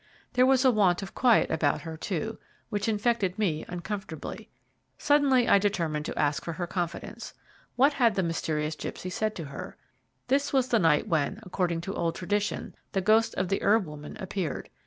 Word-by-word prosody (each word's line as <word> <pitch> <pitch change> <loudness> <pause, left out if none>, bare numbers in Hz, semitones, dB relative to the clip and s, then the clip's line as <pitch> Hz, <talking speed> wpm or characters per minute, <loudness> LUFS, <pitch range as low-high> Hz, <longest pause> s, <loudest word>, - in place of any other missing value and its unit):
There 255 +1 +5
was 265 0 +4
a 260 - +7
want 195 -4 +3
of 195 - -8
quiet 245 -3 +4
about 155 -3 +1
her, 160 -1 -6
too, 200 +6 -3 0.3
which 205 -1 -1
infected 210 -3 0
me 165 -8 0
uncomfortably. 180 -2 -6 0.5
Suddenly 280 -4 +3
I 200 - +6
determined 165 -7 -1
to - - -5
ask 145 -1 +1
for 170 - -4
her 175 +2 -3
confidence. 175 -1 -5 0.4
What 275 +4 +4
had 235 -6 +3
the 190 - +1
mysterious 155 -2 -1
gipsy 180 +3 -6
said 215 +3 -1
to 165 - -5
her? 140 - -8 0.5
This 275 +3 +1
was 260 -2 +2
the 230 - +3
night 160 -2 +3
when, 155 -7 0
according 175 -2 -1
to 195 +3 -5
old 170 0 -1
tradition, 205 +3 -2 0.2
the 195 - +1
ghost 220 +3 +3
of 185 -1 -1
the 195 - 0
herb 210 0 +3
woman 150 -1 -9
appeared. 190 -4 -4
190 Hz, 180 wpm, -28 LUFS, 165-225 Hz, 0.5 s, a